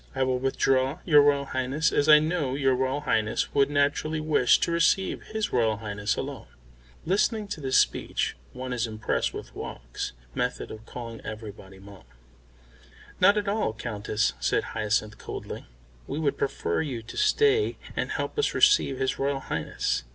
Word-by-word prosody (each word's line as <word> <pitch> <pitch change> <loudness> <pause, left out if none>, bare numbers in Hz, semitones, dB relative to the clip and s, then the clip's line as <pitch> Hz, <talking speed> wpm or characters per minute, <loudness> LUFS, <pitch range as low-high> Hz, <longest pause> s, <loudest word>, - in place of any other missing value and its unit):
I 130 - +1
will 130 -1 0
withdraw, 135 +2 +1
your 150 -4 +7
Royal 140 -1 +3
Highness, 135 +4 0
as 145 +1 +2
I 150 - +10
know 155 -4 0
your 135 -2 +2
Royal 130 +3 -1
Highness 110 -7 0
would 140 -1 +3
naturally 145 +2 +1
wish 155 -5 +4
to - - +1
receive 170 +3 +2
his 220 0 -3
Royal 115 -3 +2
Highness 105 -1 -2
alone." - - -6 0.6
Listening 210 +4 +1
to 160 - -5
this 130 -2 +2
speech - - +1 0.2
one 130 0 -5
is 120 -1 -1
impressed 110 0 -1
with - - -8
Woggs' - - -6 0.2
method 125 - -2
of 110 +1 -10
calling 115 -2 -7
everybody 105 -3 -8
"Mum." 100 -3 -14 1.1
"Not 205 - +6
at 205 -1 -1
all, 200 - 0
Countess," 110 -1 -1
said - - +1
Hyacinth 105 0 -1
coldly. - - -7 0.4
"We - - -4
would 150 -3 0
prefer 85 -10 -1
you 130 -7 -4
to - - -10
stay 430 0 +3 0.2
and - - -1
help - - -3
us 440 - +1
receive 415 - +4
his 130 - -1
Royal 140 0 0
Highness. - - -2
135 Hz, 165 wpm, -27 LUFS, 110-155 Hz, 1.1 s, I